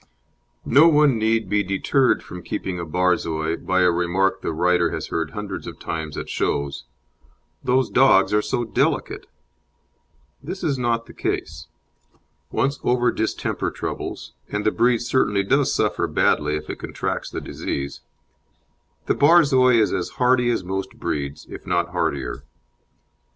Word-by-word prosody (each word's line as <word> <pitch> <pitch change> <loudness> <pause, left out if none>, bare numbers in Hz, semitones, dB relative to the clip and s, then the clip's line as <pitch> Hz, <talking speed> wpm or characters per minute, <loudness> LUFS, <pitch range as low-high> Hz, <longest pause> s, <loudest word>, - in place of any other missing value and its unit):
No 145 +6 +6
one 150 -6 +4
need 110 -1 +1
be 105 +2 +1
deterred 100 +7 +1
from 90 - -9
keeping 90 +1 -4
a 85 - -4
Borzoi 85 -2 0
by 95 0 0
a 90 -1 +5
remark 90 +3 0
the - - -2
writer 85 +1 +2
has - - -5
heard 80 -1 -2
hundreds 100 +3 -6
of - - -8
times 80 -2 -5
at - - -5
shows: 70 -2 -2 0.8
"Those 130 +1 +2
dogs 125 -7 +4
are 105 - +4
so 120 - -1
delicate." 115 - -1 1.1
This 180 +8 -7
is 140 -4 0
not 115 -1 0
the - - -14
case. 80 0 -4 0.8
Once 140 +1 -1
over 120 0 +2
distemper 110 - -2
troubles - - -6 0.2
and 105 0 -3
the 110 - +4
breed 120 +1 +2
certainly 120 -5 +1
does 135 +7 +2
suffer - - 0
badly 75 0 +1
if 75 0 -5
it - - -6
contracts - - -4
the - - -5
disease 70 0 -5 1.0
the - - +2
Borzoi 140 -6 +5
is 110 - +2
as - - -2
hardy 125 -1 +3
as 115 -6 0
most 95 +1 -4
breeds, 70 0 -4
if - - -10
not 85 -1 0
hardier. 80 -7 -2
100 Hz, 150 wpm, -22 LUFS, 85-125 Hz, 1.1 s, No